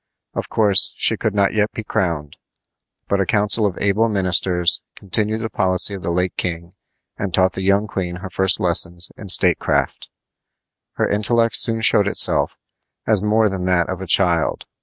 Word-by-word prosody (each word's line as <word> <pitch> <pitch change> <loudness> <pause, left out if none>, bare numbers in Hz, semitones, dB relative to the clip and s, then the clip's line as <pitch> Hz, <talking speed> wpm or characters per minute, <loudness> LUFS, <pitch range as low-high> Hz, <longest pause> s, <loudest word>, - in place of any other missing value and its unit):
Of - - -5
course, 105 -4 +2
she - - +2
could 105 -2 -3
not 100 -1 +1
yet 105 0 0
be 110 - -6
crowned, 80 -8 -3 0.7
but 100 0 0
a - - 0
council 105 +2 +2
of 95 - -6
able 105 +3 0
ministers 90 -4 +1
continued 105 +3 -1
the 110 - -4
policy 95 +1 +1
of 95 - -7
the 85 - -4
late 90 +2 -2
king 85 0 -4 0.5
and 100 -2 -3
taught 95 +2 +1
the - - -6
young 100 +2 +1
queen 90 -4 -5
her 95 +1 -8
first 95 0 +3
lessons 85 0 +2
in 100 - -11
statecraft. 90 - +1 0.8
Her - - -1
intellect 115 +3 +1
soon 115 -1 +1
showed 105 -2 +3
itself - - +2 0.5
as 110 -3 +2
more 110 +1 +2
than 95 -2 -4
that 90 -3 +1
of - - -5
a - - -7
child. 85 -4 +1
95 Hz, 175 wpm, -19 LUFS, 90-105 Hz, 0.8 s, first